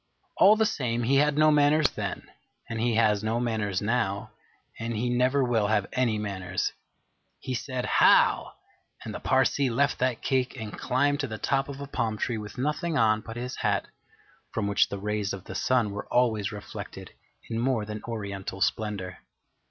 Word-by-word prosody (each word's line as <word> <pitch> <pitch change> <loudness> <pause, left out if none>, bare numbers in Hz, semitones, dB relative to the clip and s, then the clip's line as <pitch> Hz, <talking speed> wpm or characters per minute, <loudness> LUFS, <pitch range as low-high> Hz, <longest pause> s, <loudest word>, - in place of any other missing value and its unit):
All 205 +3 +7
the 220 0 +2
same, 120 - -1
he 135 +4 +3
had 150 +1 +3
no 155 0 +6
manners 150 0 +4
then, - - -4 0.4
and 115 -1 -3
he 120 -1 +1
has 110 -2 +3
no 110 +2 0
manners 110 -5 -1
now, 100 -3 -1 0.5
and 115 0 -3
he 120 +2 0
never 130 +3 +2
will 115 -4 +1
have 105 -2 +2
any 120 -4 +1
manners. 95 -3 -2 0.7
He 130 - -5
said, 125 0 -3
'How!' - - +4 0.5
and - - -5
the - - -5
Parsee 130 +1 +2
left 140 +4 +1
that 125 -2 0
cake 130 -1 0
and 110 -2 -6
climbed 145 +3 +1
to 140 - -1
the 110 -2 -5
top 135 +6 0
of 140 0 -7
a 140 - -5
palm 115 -5 -2
tree 115 +1 -2
with 105 -2 -9
nothing 150 +5 -1
on 110 -3 +3
but 115 +1 -8
his 125 +1 -5
hat, - - 0 0.6
from 110 - -2
which 100 -1 +2
the 100 - -4
rays 105 0 -2
of 95 -2 -7
the - - -8
sun 120 -5 +1
were 100 - -6
always 110 -5 +2
reflected 105 -1 -8 0.4
in 115 -1 -3
more 120 -3 0
than 105 0 -6
oriental 100 -4 -5
splendour. 95 -3 -2
115 Hz, 185 wpm, -27 LUFS, 105-130 Hz, 0.7 s, All